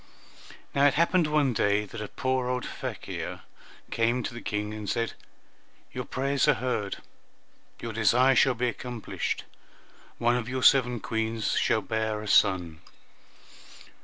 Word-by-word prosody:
Now 140 +1 +5
it 140 - +2
happened 170 +1 +3
one 150 -4 +2
day 105 0 +2
that 110 +2 -8
a 105 - -4
poor 130 +3 -1
old 125 0 -2
fakir - - -6 0.5
came 120 +2 +1
to - - -4
the 120 - -7
King 105 0 -3
and 105 -1 -5
said, 115 -1 -1 0.8
"Your - - -5
prayers 135 +1 0
are - - +5
heard, 115 -6 -2 0.8
your 115 -1 -5
desire 120 +5 +4
shall 130 -1 +4
be 125 +2 0
accomplished, 120 -1 -4 0.7
and - - -6
one 120 +1 +4
of 120 -1 -4
your 130 0 -2
seven 125 -4 +5
Queens 110 0 -1
shall 110 - +2
bear 110 0 -2
a - - -7
son." 90 -6 +3
120 Hz, 150 wpm, -27 LUFS, 110-130 Hz, 0.8 s, Now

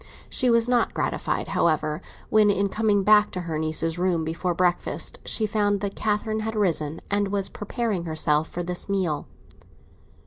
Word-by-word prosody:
She 255 - +2
was 230 0 +3
not 245 -2 +1
gratified, - - -1
however, 155 0 +1 0.3
when, 215 -1 +5
in 200 0 +1
coming 210 -1 +1
back 210 +1 +5
to 185 - -3
her 165 -3 -3
niece's 160 +1 -1
room 175 -3 +1
before 170 +2 -2
breakfast, 175 0 -1
she 220 - 0
found 205 -1 +1
that 200 -1 -3
Catherine 215 0 -1
had 220 +1 -3
risen 165 -7 0
and 205 0 +1
was 195 -1 -1
preparing 210 -4 -3
herself 155 -1 +1
for 175 - -5
this 180 +2 -4
meal. 180 -7 -1
195 Hz, 165 wpm, -25 LUFS, 165-210 Hz, 0.3 s, when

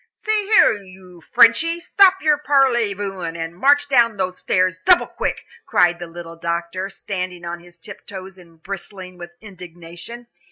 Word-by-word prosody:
"See 425 -2 -2
here - - +7
you, 185 -4 -11
Frenchy, 320 - +4
stop 380 +1 +3
your 300 -2 +3
parley 260 -8 +2
vousing, 185 -4 -5
and 165 0 -6
march 285 +7 +3
down 235 -5 +3
those 185 -1 -3
stairs 185 -1 0
double 360 - +5
quick," - - -4 0.2
cried 175 -1 +2
the 175 - -7
little 165 0 -10
doctor, 170 +3 -4
standing 185 -3 -6
on 170 0 -5
his 175 0 -18
tiptoes 190 +1 -11
and 165 -2 -20
bristling 185 -1 -8
with 175 0 -10
indignation. 180 +3 -11
185 Hz, 155 wpm, -20 LUFS, 175-235 Hz, 0.2 s, here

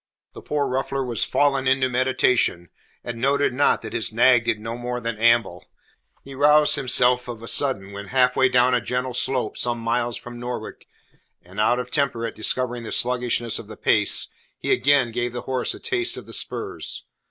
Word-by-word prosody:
The - - -11
poor 145 -1 -2
ruffler 135 +1 -2
was 120 -4 -1
fallen 140 -2 +1
into 130 0 +2
meditation, 125 -8 +1 0.3
and 115 -1 -6
noted 140 0 +1
not 140 -2 +2
that 110 - -7
his 110 - 0
nag 120 +1 +4
did 110 - 0
no 115 +2 -6
more 125 0 -4
than 115 -1 -4
amble. 115 -6 +2 0.6
He 135 - -11
roused 150 +2 +4
himself 125 -1 +2
of 120 -2 -7
a - - -8
sudden 115 -10 0
when 100 0 -8
half 125 +1 +2
way 130 -1 +3
down 125 0 +3
a 125 - +2
gentle 125 0 -3
slope 125 -2 -1
some 120 -1 0
five - - -9
miles 120 0 -1
from 120 0 -10
Norwich, 125 +1 -7 0.6
and 90 +4 -10
out 115 +3 +2
of 125 - -5
temper 135 -6 0
at 115 - -5
discovering 125 +2 -1
the 110 - -7
sluggishness 120 -2 +1
of - - -11
the - - -11
pace, - - +3 0.3
he - - -3
again 140 -4 +3
gave 120 +1 -3
the 120 - -5
horse 130 -1 -2
a - - -12
taste 360 -2 +1
of - - -9
the - - -10
spurs. - - -2
125 Hz, 200 wpm, -22 LUFS, 115-130 Hz, 0.6 s, nag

